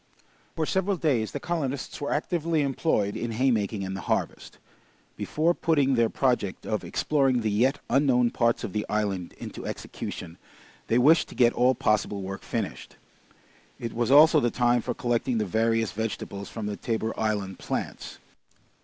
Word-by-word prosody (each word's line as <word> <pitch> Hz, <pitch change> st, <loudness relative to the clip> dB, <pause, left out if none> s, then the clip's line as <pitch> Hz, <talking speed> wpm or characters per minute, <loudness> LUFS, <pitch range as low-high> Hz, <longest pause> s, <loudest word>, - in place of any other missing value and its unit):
For 160 Hz, -, 0 dB
several 190 Hz, +3 st, 0 dB
days 130 Hz, -10 st, 0 dB
the 145 Hz, -, -4 dB
colonists 140 Hz, -6 st, -3 dB
were 145 Hz, -, -2 dB
actively 160 Hz, 0 st, 0 dB
employed 135 Hz, -7 st, 0 dB
in 115 Hz, -1 st, -3 dB
haymaking 110 Hz, -5 st, 0 dB
and 95 Hz, 0 st, -4 dB
the 95 Hz, -, -5 dB
harvest. -, -, -3 dB, 0.6 s
Before 165 Hz, +3 st, +1 dB
putting 145 Hz, -6 st, +2 dB
their 115 Hz, -2 st, +3 dB
project 120 Hz, -8 st, 0 dB
of 110 Hz, -, -2 dB
exploring 135 Hz, -5 st, +1 dB
the 110 Hz, -1 st, 0 dB
yet 125 Hz, +7 st, +2 dB
unknown 125 Hz, -3 st, +3 dB
parts 115 Hz, 0 st, +1 dB
of 95 Hz, -, -5 dB
the 105 Hz, -, -1 dB
island 100 Hz, -4 st, -2 dB
into -, -, -8 dB
execution, 85 Hz, -2 st, -6 dB, 0.5 s
they 115 Hz, -, +2 dB
wished 150 Hz, +6 st, +5 dB
to -, -, -11 dB
get 120 Hz, -1 st, +4 dB
all 125 Hz, +1 st, +3 dB
possible 105 Hz, -3 st, 0 dB
work 95 Hz, +1 st, -6 dB
finished. -, -, -5 dB, 0.8 s
It 115 Hz, -2 st, -5 dB
was 120 Hz, 0 st, -1 dB
also 155 Hz, +3 st, +7 dB
the 120 Hz, -, +1 dB
time 120 Hz, 0 st, +2 dB
for -, -, -3 dB
collecting 120 Hz, 0 st, 0 dB
the 105 Hz, -, 0 dB
various 115 Hz, +2 st, +1 dB
vegetables 100 Hz, -2 st, -4 dB
from 110 Hz, -2 st, -6 dB
the 105 Hz, -1 st, -3 dB
Tabor 110 Hz, -1 st, -2 dB
Island 105 Hz, -4 st, -1 dB
plants. -, -, -5 dB
120 Hz, 160 wpm, -26 LUFS, 105-140 Hz, 0.8 s, also